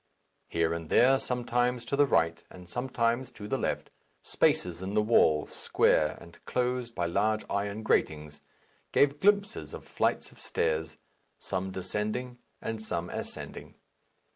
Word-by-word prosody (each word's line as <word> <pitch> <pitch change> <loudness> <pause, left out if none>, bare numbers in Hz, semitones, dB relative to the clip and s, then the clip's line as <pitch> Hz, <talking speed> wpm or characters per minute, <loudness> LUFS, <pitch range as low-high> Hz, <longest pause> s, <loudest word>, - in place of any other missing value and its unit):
Here 85 0 +1
and 80 -1 -5
there, 130 +2 +5
sometimes 125 -1 0
to - - -1
the 145 0 +4
right 85 -6 +2
and 90 -1 -13
sometimes 120 +2 -1
to 105 - -8
the - - -1
left, - - -2 0.3
spaces 90 -1 +1
in 95 +2 -4
the 105 - +4
wall, 80 -9 +4
square 75 -1 +2
and 85 - -15
closed 125 -1 -1
by 85 - 0
large 110 +5 +1
iron 100 +2 -2
gratings, 75 -7 0 0.5
gave 145 +1 +3
glimpses 200 - +1
of - - -10
flights - - -1
of - - -17
stairs, 80 -1 -1 0.4
some 95 +1 -3
descending 105 +7 -2 0.2
and 110 -1 -3
some 90 -5 -3
ascending. - - -5
105 Hz, 140 wpm, -29 LUFS, 85-125 Hz, 0.5 s, there